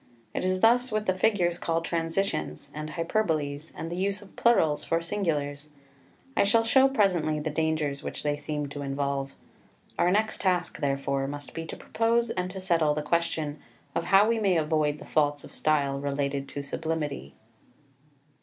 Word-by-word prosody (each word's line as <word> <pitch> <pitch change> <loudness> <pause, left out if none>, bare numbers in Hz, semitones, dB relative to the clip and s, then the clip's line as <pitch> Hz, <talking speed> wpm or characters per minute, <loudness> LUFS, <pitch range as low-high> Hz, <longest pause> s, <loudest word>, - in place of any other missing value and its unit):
It - - -2
is 185 0 0
thus 245 +2 +5
with 215 0 0
the 185 - +1
figures 185 -4 +2
called 165 0 -1
transitions, 165 - -2
and 150 0 -5
hyperboles, 160 -4 -1
and 165 - -5
the - - -2
use 200 +3 -1
of 195 - -17
plurals 160 -11 +3
for 165 - +1
singulars. 150 -6 -2 0.7
I - - +4
shall 225 +3 +4
show 265 +4 +5
presently 180 - +2
the 150 +1 -3
dangers 155 -2 0
which - - -6
they 145 -1 +1
seem 150 0 -3
to 145 0 -6
involve. 140 0 -2 0.6
Our 175 - +4
next 215 +4 +1
task, 180 -3 0
therefore, 140 -1 0
must 145 +1 -7
be 165 0 -5
to - - -7
propose 230 0 +1
and 180 0 -2
to 190 +1 -6
settle 165 -5 +2
the 150 - -2
question 155 -2 -1 0.4
how 195 +4 +4
we 230 0 +2
may 195 -5 +3
avoid 155 -1 +1
the - - -11
faults 145 -1 +1
of - - -12
style 140 -3 +1
related 140 0 -2
to 145 - -5
sublimity. 155 0 -3
160 Hz, 170 wpm, -27 LUFS, 145-190 Hz, 0.7 s, thus